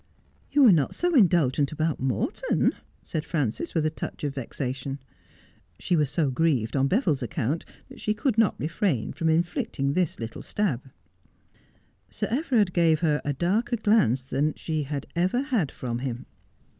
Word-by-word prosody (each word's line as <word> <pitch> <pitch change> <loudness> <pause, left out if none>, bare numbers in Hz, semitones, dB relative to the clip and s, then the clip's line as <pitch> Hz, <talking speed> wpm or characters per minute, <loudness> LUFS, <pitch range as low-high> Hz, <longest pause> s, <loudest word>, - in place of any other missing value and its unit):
' - - -36
You 290 0 +5
were 240 - +9
not 155 -7 +2
so 355 0 0
indulgent 160 - +3
about 155 0 -1
Morton,' 130 -5 0 0.3
said 155 - -3
Frances, 150 0 -2
with 160 -2 +2
a 155 - +1
touch 160 - -6
of 145 -2 -1
vexation. 135 +1 -4 0.8
She 180 - 0
was 150 -4 +2
so 150 -2 +1
grieved 130 -6 +1
on 135 0 +3
Beville's 180 - +1
account 125 +6 -2 0.2
that - - -13
she 215 - 0
could 235 +2 0
not 225 -3 +2
refrain 155 - -1
from 160 +3 0
inflicting 160 -4 0
this 180 -1 0
little 115 -1 -6
stab. 140 - -2 1.2
Sir - - -3
Everard 240 - +2
gave 165 -3 +3
her 150 -3 +2
a 145 - -1
darker 210 - 0
glance 205 - +3
than 140 +3 -1
she 155 -2 -2
had 145 -1 -4
ever 185 +8 +1
had 235 - 0
from 120 -2 -4
him. 125 -1 -4
155 Hz, 165 wpm, -26 LUFS, 135-185 Hz, 1.2 s, were